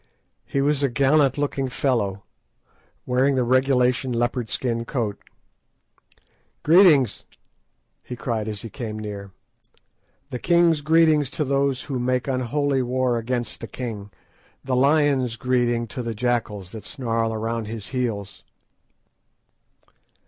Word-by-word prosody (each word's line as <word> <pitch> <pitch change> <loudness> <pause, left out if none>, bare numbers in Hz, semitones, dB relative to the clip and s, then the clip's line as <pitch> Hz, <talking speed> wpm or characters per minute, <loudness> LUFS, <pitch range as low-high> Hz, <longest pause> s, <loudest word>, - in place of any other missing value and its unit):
He 140 - 0
was 145 0 +1
a 140 - +2
gallant 140 +2 +3
looking 140 -2 -1
fellow, 115 -7 -1 0.8
wearing 130 +2 +2
the 130 - +2
regulation 130 0 +2
leopard 120 0 -1
skin 115 -2 -2
cloak. 115 -5 -3 1.4
"Greeting!" 165 -5 +7 1.0
he 125 - -7
cried, 115 -3 -3
as 105 -2 -5
he 115 - -6
came; 110 -5 -5 1.3
"the 125 - -4
king's 170 -1 +3
greeting 160 0 +4
to 150 +3 -3
those 140 -1 0
who 135 -3 -3
make 125 +1 0
unholy 135 +2 0
war 125 -1 0
against 120 +1 -3
the 115 - -7
king; 110 -6 -6 0.5
the 130 -1 -1
lion's 135 -3 +3
greeting 120 -2 +1
to 125 - -5
the 115 -2 -4
jackals 105 -5 -2
that 110 -3 -8
snarl 115 -3 -2
around 115 +1 -3
his 110 -2 -6
heels." 115 -6 -3
125 Hz, 120 wpm, -23 LUFS, 115-140 Hz, 1.4 s, Greeting